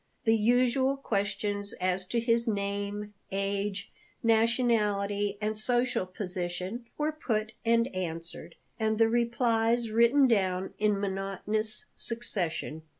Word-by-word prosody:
The 225 Hz, -2 st, +4 dB
usual 250 Hz, +4 st, +3 dB
questions 205 Hz, -3 st, -1 dB
as 185 Hz, 0 st, -1 dB
to 235 Hz, -, 0 dB
his 230 Hz, 0 st, +2 dB
name, 205 Hz, 0 st, -2 dB, 0.2 s
age, 200 Hz, +1 st, -2 dB, 0.3 s
nationality, 215 Hz, -3 st, +2 dB
and 215 Hz, +1 st, -1 dB
social 240 Hz, -1 st, +1 dB
position 185 Hz, +3 st, -4 dB
were 300 Hz, +1 st, 0 dB
put 225 Hz, -8 st, -2 dB
and 230 Hz, +1 st, +3 dB
answered, 165 Hz, -1 st, -4 dB, 0.2 s
and 220 Hz, 0 st, +1 dB
the 225 Hz, 0 st, +4 dB
replies 235 Hz, -1 st, +1 dB
written 235 Hz, +5 st, +5 dB
down 190 Hz, -5 st, +1 dB
in 210 Hz, -1 st, +2 dB
monotonous 200 Hz, +3 st, -2 dB
succession. 180 Hz, -9 st, -3 dB
215 Hz, 110 wpm, -29 LUFS, 195-235 Hz, 0.3 s, written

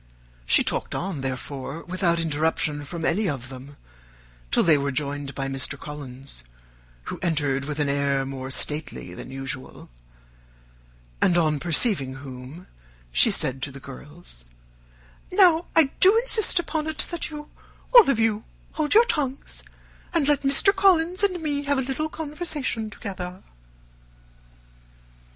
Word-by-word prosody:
She -, -, +5 dB
talked -, -, -2 dB
on, 175 Hz, -6 st, -3 dB
therefore, 135 Hz, +3 st, -5 dB
without 180 Hz, -2 st, 0 dB
interruption 155 Hz, -2 st, -1 dB
from 165 Hz, +2 st, -5 dB
any 200 Hz, +4 st, +1 dB
of 130 Hz, -4 st, -5 dB
them 135 Hz, +2 st, -11 dB, 0.7 s
till -, -, +3 dB
they 165 Hz, -3 st, +5 dB
were 140 Hz, -1 st, 0 dB
joined 140 Hz, 0 st, -3 dB
by 135 Hz, 0 st, -2 dB
Mr. 135 Hz, +1 st, -1 dB
Collins, 135 Hz, -, -5 dB, 0.6 s
who -, -, -6 dB
entered 145 Hz, -5 st, 0 dB
with 150 Hz, 0 st, -4 dB
an 145 Hz, -, +1 dB
air 140 Hz, -1 st, +1 dB
more 135 Hz, -1 st, -6 dB
stately 145 Hz, -, -3 dB
than 90 Hz, -, -9 dB
usual, 135 Hz, -, -7 dB, 1.3 s
and 175 Hz, -, +4 dB
on 155 Hz, -3 st, +2 dB
perceiving 155 Hz, -, +1 dB
whom, 135 Hz, +5 st, -9 dB, 0.5 s
she -, -, +5 dB
said 130 Hz, 0 st, 0 dB
to 140 Hz, -, -2 dB
the 140 Hz, -, -10 dB
girls, 140 Hz, -, -12 dB, 0.9 s
"Now, 355 Hz, -3 st, +5 dB
I 305 Hz, -4 st, +5 dB
do 390 Hz, +4 st, +7 dB
insist 455 Hz, -5 st, +2 dB
upon 315 Hz, -3 st, -1 dB
it, 315 Hz, -1 st, +2 dB
that 345 Hz, -, -3 dB
you, 300 Hz, -1 st, -9 dB, 0.4 s
all 475 Hz, -, +9 dB
of 275 Hz, -, +3 dB
you, 225 Hz, -1 st, +1 dB, 0.3 s
hold 305 Hz, +3 st, 0 dB
your 460 Hz, +2 st, +8 dB
tongues, 280 Hz, -, -3 dB, 0.5 s
and 305 Hz, -4 st, +3 dB
let 295 Hz, -2 st, +3 dB
Mr. 280 Hz, +9 st, +4 dB
Collins 365 Hz, -2 st, +3 dB
and 380 Hz, -3 st, +1 dB
me 290 Hz, -2 st, -1 dB
have 285 Hz, 0 st, +1 dB
a -, -, +2 dB
little 270 Hz, +4 st, -2 dB
conversation 300 Hz, -8 st, -3 dB
together." 185 Hz, -4 st, -7 dB
165 Hz, 140 wpm, -25 LUFS, -, 1.3 s, all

